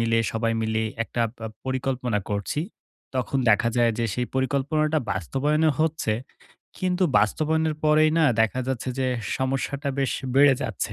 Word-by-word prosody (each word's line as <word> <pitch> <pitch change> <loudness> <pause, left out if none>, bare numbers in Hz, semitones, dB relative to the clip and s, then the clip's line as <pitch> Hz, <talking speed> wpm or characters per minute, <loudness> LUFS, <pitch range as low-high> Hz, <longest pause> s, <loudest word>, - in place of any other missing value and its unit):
মিলে 115 0 +2
সবাই 115 0 0
মিলে 110 0 0 0.2
একটা 120 - -2 0.2
প - - -26 0.2
পরিকল্পনা 130 -3 -1
করছি, 100 +8 -2 0.5
তখন 130 +2 -1
দেখা 110 +3 +3
যায় 120 -1 +3
যে, 115 - +1
সেই 125 0 -1
পরিকল্পনাটা 145 +4 +1
বাস্তবায়নও 145 - +1
হচ্ছে। 160 -8 0 0.7
কিন্তু 185 0 +1
বাস্তবায়নের 155 +7 +1
পরেই 155 0 +5
না 160 - +4 0.2
দেখা 110 +3 +2
যাচ্ছে 130 -1 -2
যে, 130 - +1 0.3
সমস্যাটা 135 +2 -2
বেশ 135 -2 +1 0.2
বেড়ে 140 0 +6
যাচ্ছে। - - -3
130 Hz, 145 wpm, -25 LUFS, 115-150 Hz, 0.7 s, বেড়ে